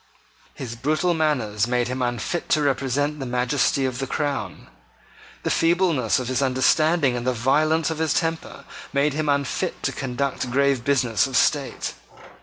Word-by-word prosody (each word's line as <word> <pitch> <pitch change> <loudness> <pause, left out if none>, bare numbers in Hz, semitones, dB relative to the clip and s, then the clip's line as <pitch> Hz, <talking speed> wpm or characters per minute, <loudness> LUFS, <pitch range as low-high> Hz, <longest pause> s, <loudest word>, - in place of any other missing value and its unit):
His 120 -3 -6
brutal 155 +8 0
manners 120 -10 0
made 120 0 0
him 130 +1 -3
unfit 120 +7 -2
to 150 - +3
represent 145 +2 0
the 135 - -4
majesty 125 +2 +1
of 130 -1 -3
the 135 - -3
crown. 145 +1 -3 0.8
The - - 0
feebleness 165 - +2
of 125 - -3
his 130 +1 0
understanding 135 +2 +2
and 120 +1 -4
the 130 - +2
violence 155 +6 +1
of 160 - -4
his 160 -2 +1
temper 165 -1 -3 0.3
made 140 +1 +1
him 150 0 -1
unfit 140 -2 -1
to - - 0
conduct 130 0 -3
grave 135 -1 +1
business 130 -4 +2
of 130 - -1
state. 145 -3 0
135 Hz, 160 wpm, -23 LUFS, 125-150 Hz, 0.8 s, to